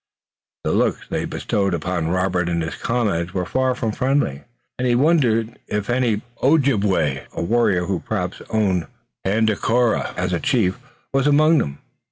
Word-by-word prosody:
The -, -, 0 dB
looks -, -, +1 dB
they -, -, -2 dB
bestowed 100 Hz, -3 st, -1 dB
upon 85 Hz, 0 st, -2 dB
Robert 90 Hz, -1 st, 0 dB
and 85 Hz, -1 st, 0 dB
his 80 Hz, -, -4 dB
comrades 100 Hz, -8 st, -1 dB
were 90 Hz, -1 st, 0 dB
far 130 Hz, +4 st, 0 dB
from 115 Hz, -3 st, -2 dB
friendly, 130 Hz, -, 0 dB, 0.3 s
and 125 Hz, -, +1 dB
he 120 Hz, -, +3 dB
wondered 120 Hz, -6 st, +2 dB
if 105 Hz, +2 st, -2 dB
any 120 Hz, -4 st, +1 dB, 0.2 s
Ojibway, 105 Hz, -, +2 dB
a -, -, -3 dB
warrior 100 Hz, -3 st, +2 dB
who 95 Hz, -1 st, -1 dB
perhaps 90 Hz, -4 st, -3 dB
owned 100 Hz, -6 st, +1 dB, 0.4 s
Tandakora 110 Hz, +3 st, +1 dB
as 90 Hz, 0 st, -1 dB
a 85 Hz, -, +1 dB
chief, 95 Hz, -5 st, +1 dB, 0.3 s
was 135 Hz, +1 st, +2 dB
among 155 Hz, +2 st, +5 dB
them. 70 Hz, 0 st, -3 dB
105 Hz, 155 wpm, -21 LUFS, 90-125 Hz, 0.4 s, among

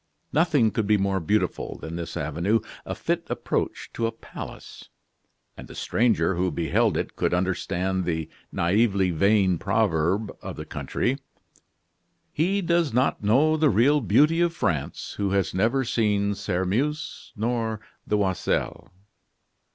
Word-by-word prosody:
Nothing 150 Hz, -8 st, +3 dB
could 105 Hz, 0 st, -1 dB
be 105 Hz, 0 st, +4 dB
more 95 Hz, -1 st, 0 dB
beautiful 105 Hz, +6 st, -1 dB
than 80 Hz, +1 st, -7 dB
this 85 Hz, -1 st, -5 dB
avenue, 85 Hz, +9 st, +1 dB, 0.3 s
a -, -, -3 dB
fit -, -, -2 dB
approach -, -, -2 dB
to 115 Hz, -, 0 dB
a -, -, -2 dB
palace; 115 Hz, -, -10 dB, 0.7 s
and -, -, -10 dB
the -, -, -11 dB
stranger 115 Hz, -4 st, +1 dB
who 90 Hz, +1 st, 0 dB
beheld 85 Hz, -2 st, +1 dB
it -, -, -3 dB
could -, -, +1 dB
understand 95 Hz, 0 st, -1 dB
the 80 Hz, -3 st, -2 dB, 0.2 s
naively 95 Hz, +1 st, +2 dB
vain 95 Hz, 0 st, +3 dB
proverb 100 Hz, 0 st, +1 dB
of -, -, -6 dB
the -, -, -7 dB
country: 135 Hz, +3 st, -2 dB, 1.1 s
"He 190 Hz, +6 st, +1 dB
does 170 Hz, -3 st, +2 dB
not 125 Hz, +3 st, +1 dB
know 140 Hz, +10 st, +4 dB
the 155 Hz, -1 st, +4 dB
real 140 Hz, +6 st, +4 dB
beauty 150 Hz, +10 st, +4 dB
of 170 Hz, -1 st, +1 dB
France, 80 Hz, -, -2 dB
who 100 Hz, -1 st, 0 dB
has 95 Hz, -4 st, +1 dB
never 115 Hz, +8 st, +2 dB
seen 105 Hz, -3 st, +1 dB
Sairmeuse 105 Hz, +11 st, -2 dB
nor 110 Hz, 0 st, -1 dB, 0.3 s
the 105 Hz, -, +2 dB
Oiselle." 95 Hz, -3 st, -1 dB
105 Hz, 140 wpm, -25 LUFS, 95-125 Hz, 1.1 s, be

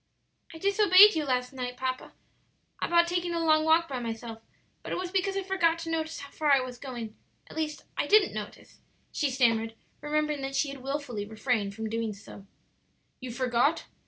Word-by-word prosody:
"I 325 Hz, -, -10 dB
disobeyed 400 Hz, +2 st, +7 dB
you 315 Hz, -3 st, -1 dB
last 250 Hz, -1 st, -1 dB
night, 250 Hz, -1 st, -5 dB
papa, 255 Hz, 0 st, -4 dB, 0.7 s
about 340 Hz, 0 st, +4 dB
taking 345 Hz, 0 st, -2 dB
a -, -, 0 dB
long 310 Hz, -1 st, +3 dB
walk 325 Hz, +1 st, +4 dB
by 265 Hz, -4 st, -4 dB
myself; 225 Hz, -1 st, -6 dB, 0.4 s
but -, -, -8 dB
it -, -, -1 dB
was 365 Hz, -1 st, -4 dB
because 390 Hz, 0 st, 0 dB
I 390 Hz, -, -1 dB
forgot 370 Hz, -3 st, +1 dB
to 330 Hz, 0 st, -5 dB
notice 320 Hz, 0 st, -3 dB
how 280 Hz, -, -10 dB
far 300 Hz, -2 st, 0 dB
I 275 Hz, -, +6 dB
was 255 Hz, -1 st, -6 dB
going; 240 Hz, -5 st, -7 dB, 0.3 s
at -, -, -14 dB
least, 310 Hz, -1 st, -3 dB
I -, -, -1 dB
didn't 415 Hz, -2 st, +5 dB
notice," 210 Hz, -1 st, -8 dB, 0.3 s
she 290 Hz, -, 0 dB
stammered, 230 Hz, -3 st, +1 dB, 0.3 s
remembering 300 Hz, -1 st, -1 dB
that 270 Hz, 0 st, -4 dB
she 290 Hz, -, +1 dB
had 275 Hz, 0 st, -8 dB
wilfully 270 Hz, -5 st, -4 dB
refrained 215 Hz, -2 st, -1 dB
from 220 Hz, 0 st, -5 dB
so -, -, -3 dB
doing. 215 Hz, -3 st, -6 dB, 0.7 s
"You 255 Hz, -, -7 dB
forgot? 250 Hz, +5 st, +1 dB
275 Hz, 190 wpm, -28 LUFS, 240-330 Hz, 0.7 s, disobeyed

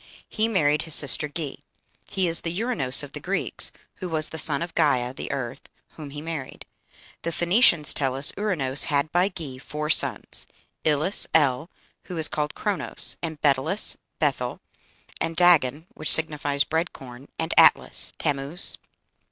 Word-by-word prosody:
He 220 Hz, 0 st, -2 dB
married 150 Hz, -9 st, 0 dB
his 160 Hz, -3 st, -1 dB
sister 145 Hz, +1 st, +2 dB
Ge. 145 Hz, -2 st, -6 dB, 0.5 s
He 190 Hz, -3 st, -1 dB
is 165 Hz, 0 st, +4 dB
the 165 Hz, -, -5 dB
Uranos 190 Hz, -, +2 dB
of -, -, -10 dB
the -, -, -7 dB
Greeks, -, -, -2 dB, 0.3 s
who 185 Hz, -, -7 dB
was 155 Hz, -2 st, -2 dB
the 160 Hz, -, -3 dB
son 150 Hz, +1 st, +2 dB
of 170 Hz, -, -9 dB
Gæa 125 Hz, -3 st, 0 dB
(the -, -, -7 dB
earth), 130 Hz, -2 st, -7 dB, 0.2 s
whom 150 Hz, -3 st, -11 dB
he 145 Hz, +1 st, -9 dB
married. 160 Hz, -5 st, -8 dB, 0.6 s
The 170 Hz, -, -4 dB
Phoenicians 175 Hz, -, +2 dB
tell 135 Hz, -2 st, -2 dB
us, 135 Hz, +2 st, +4 dB
"Ouranos 150 Hz, -10 st, 0 dB
had 145 Hz, 0 st, -1 dB
by 180 Hz, +3 st, +1 dB
Ge 150 Hz, -9 st, -9 dB
four 150 Hz, +2 st, -4 dB
sons: -, -, +2 dB, 0.4 s
Ilus 155 Hz, +6 st, +2 dB
(El), 145 Hz, 0 st, +2 dB, 0.4 s
who 180 Hz, -, -8 dB
is 160 Hz, -, +2 dB
called 150 Hz, 0 st, -4 dB
Chronos, 205 Hz, -3 st, +2 dB
and 160 Hz, -3 st, -6 dB
Betylus 150 Hz, +8 st, +4 dB, 0.2 s
(Beth -, -, -1 dB
El), -, -, -5 dB, 0.6 s
and 165 Hz, -, -3 dB
Dagon, 160 Hz, -4 st, +3 dB
which 155 Hz, -, -2 dB
signifies 145 Hz, -3 st, +4 dB
bread 160 Hz, +4 st, -3 dB
corn, 125 Hz, +1 st, -13 dB
and 160 Hz, -, -3 dB
Atlas -, -, +3 dB
(Tammuz?)." 145 Hz, +5 st, +1 dB
155 Hz, 160 wpm, -23 LUFS, 140-170 Hz, 0.6 s, is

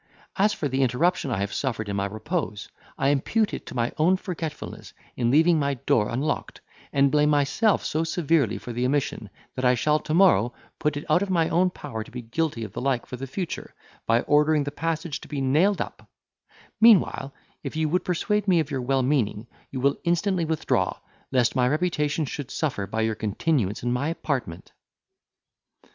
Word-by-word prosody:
As 210 Hz, +2 st, +3 dB
for 160 Hz, -7 st, -2 dB
the 135 Hz, 0 st, -1 dB
interruption 140 Hz, +6 st, +1 dB
I 115 Hz, -, -1 dB
have 100 Hz, 0 st, -2 dB
suffered 115 Hz, -6 st, -2 dB
in 100 Hz, -, -3 dB
my 100 Hz, 0 st, 0 dB
repose, 110 Hz, -, -4 dB, 0.3 s
I 135 Hz, -, +2 dB
impute 200 Hz, -, +1 dB
it -, -, -6 dB
to -, -, -8 dB
my 120 Hz, -1 st, 0 dB
own 180 Hz, +4 st, +4 dB
forgetfulness, 165 Hz, -5 st, -6 dB, 0.2 s
in 120 Hz, -2 st, +1 dB
leaving 160 Hz, +4 st, +4 dB
my 140 Hz, -1 st, 0 dB
door 110 Hz, -3 st, +1 dB
unlocked, 135 Hz, +6 st, -2 dB, 0.3 s
and 140 Hz, -1 st, +3 dB
blame 150 Hz, 0 st, +3 dB
myself 150 Hz, +9 st, +2 dB
so 155 Hz, +2 st, 0 dB
severely 160 Hz, -, +1 dB
for 120 Hz, -, -7 dB
the 120 Hz, +2 st, -2 dB
omission, 130 Hz, -5 st, -1 dB, 0.2 s
that 130 Hz, -, -5 dB
I 125 Hz, 0 st, +4 dB
shall, 150 Hz, +5 st, +2 dB
to 155 Hz, -, -4 dB
morrow, 125 Hz, -, +4 dB, 0.2 s
put 150 Hz, -2 st, 0 dB
it 145 Hz, -, -6 dB
out 180 Hz, -, +3 dB
of 200 Hz, -, -2 dB
my 165 Hz, -3 st, +2 dB
own 180 Hz, +2 st, +3 dB
power 135 Hz, -10 st, -6 dB
to -, -, -15 dB
be 125 Hz, -1 st, -7 dB
guilty 125 Hz, 0 st, -2 dB
of 105 Hz, -3 st, -7 dB
the -, -, -4 dB
like 130 Hz, -2 st, 0 dB
for -, -, -7 dB
the 135 Hz, +2 st, -6 dB
future, 175 Hz, +5 st, -5 dB, 0.3 s
by 115 Hz, +1 st, +4 dB
ordering 150 Hz, +1 st, +3 dB
the 145 Hz, -, -4 dB
passage 165 Hz, 0 st, -3 dB
to -, -, -11 dB
be 145 Hz, -, -4 dB
nailed 155 Hz, +10 st, +2 dB
up; -, -, -7 dB, 0.7 s
meanwhile, 215 Hz, -10 st, +5 dB, 0.3 s
if -, -, -6 dB
you 160 Hz, 0 st, +1 dB
would 180 Hz, +4 st, +1 dB
persuade 210 Hz, +4 st, 0 dB
me 180 Hz, -3 st, +4 dB
of 155 Hz, -2 st, -2 dB
your 135 Hz, -2 st, -1 dB
well 130 Hz, +1 st, +1 dB
meaning, 120 Hz, -6 st, 0 dB, 0.2 s
you 130 Hz, -, -5 dB
will 140 Hz, +2 st, +2 dB
instantly 175 Hz, +1 st, +1 dB
withdraw, 160 Hz, -1 st, 0 dB, 0.3 s
lest 125 Hz, -2 st, +2 dB
my 125 Hz, -2 st, +3 dB
reputation 150 Hz, 0 st, 0 dB
should 140 Hz, 0 st, -6 dB
suffer 125 Hz, -11 st, -2 dB
by 110 Hz, -, -2 dB
your 110 Hz, 0 st, +1 dB
continuance 110 Hz, -, -1 dB
in 120 Hz, 0 st, 0 dB
my 130 Hz, +4 st, -1 dB
apartment." 135 Hz, -, -4 dB
145 Hz, 195 wpm, -25 LUFS, 125-165 Hz, 0.7 s, meanwhile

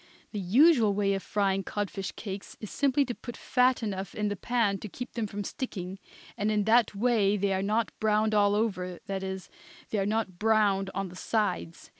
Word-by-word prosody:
The 210 Hz, -, -3 dB
usual 225 Hz, -, +5 dB
way 200 Hz, -1 st, +2 dB
of 195 Hz, -, -2 dB
frying 195 Hz, -1 st, 0 dB
codfish 195 Hz, -1 st, -3 dB
cakes 195 Hz, -2 st, -7 dB
is 215 Hz, -, -7 dB
simply 280 Hz, 0 st, +2 dB
to 245 Hz, -, -3 dB
put 240 Hz, 0 st, -9 dB
fat 250 Hz, -1 st, +2 dB
enough 195 Hz, -3 st, -4 dB
in 210 Hz, -1 st, 0 dB
the 205 Hz, -, -2 dB
pan 215 Hz, -2 st, 0 dB
to 210 Hz, -, -7 dB
keep 250 Hz, +6 st, -7 dB
them 230 Hz, -3 st, -2 dB
from 205 Hz, 0 st, -5 dB
sticking, 190 Hz, -5 st, -5 dB, 0.4 s
and 210 Hz, -, 0 dB
in 210 Hz, -1 st, +2 dB
that 220 Hz, 0 st, +4 dB
way 210 Hz, -2 st, +2 dB
they 200 Hz, 0 st, +1 dB
are 190 Hz, -, 0 dB
not 215 Hz, +3 st, 0 dB
browned 215 Hz, 0 st, +2 dB
all 205 Hz, -1 st, +4 dB
over, 185 Hz, -5 st, -1 dB
that 195 Hz, -1 st, -3 dB
is, 190 Hz, -1 st, -5 dB, 0.4 s
they 215 Hz, -, +1 dB
are 195 Hz, -, 0 dB
not 210 Hz, -4 st, -1 dB
browned 210 Hz, -3 st, +3 dB
on 195 Hz, -1 st, -2 dB
the 180 Hz, -, -12 dB
sides. 185 Hz, -4 st, -2 dB
205 Hz, 200 wpm, -29 LUFS, 195-225 Hz, 0.4 s, usual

